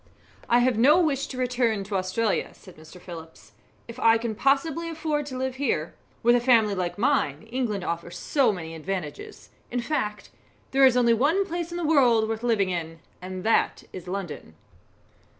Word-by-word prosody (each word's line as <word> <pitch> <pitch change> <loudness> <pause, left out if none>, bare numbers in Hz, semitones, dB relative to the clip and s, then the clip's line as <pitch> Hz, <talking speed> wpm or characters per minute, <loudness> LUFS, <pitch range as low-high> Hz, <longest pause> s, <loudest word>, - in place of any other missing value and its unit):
"I 240 - +5
have 250 -4 +1
no 295 +8 +6
wish 285 -6 0
to 260 - -8
return 245 -4 0
to 200 +1 -5
Australia," 190 +3 0
said 185 - -15
Mr. 160 +3 -14
Phillips, 165 - -11 0.4
"if 235 +1 -9
I 225 -1 +5
can 230 -1 -3
possibly 280 +7 0
afford 310 -3 -2
to 260 -3 -6
live 260 0 -3
here. 200 - -1 0.3
With 240 +1 +5
a - - +4
family 230 -4 +4
like 180 -1 -3
mine, 270 0 +1
England 230 -7 -2
offers 170 0 -4
so 275 +3 +2
many 165 -4 -6
advantages. 180 - -6 0.2
In 245 - -2
fact, 210 -6 -3 0.4
there 270 0 +6
is 250 -1 +2
only 235 -1 +4
one 310 - +2
place 345 -2 -4
in 345 - -5
the 345 - -2
world 245 -8 +4
worth 220 0 -3
living 220 -6 +1
in, 165 -2 -4 0.2
and 185 0 -6
that 225 - +1
is 185 -1 -9
London." 180 - -6
230 Hz, 180 wpm, -25 LUFS, 185-270 Hz, 0.4 s, no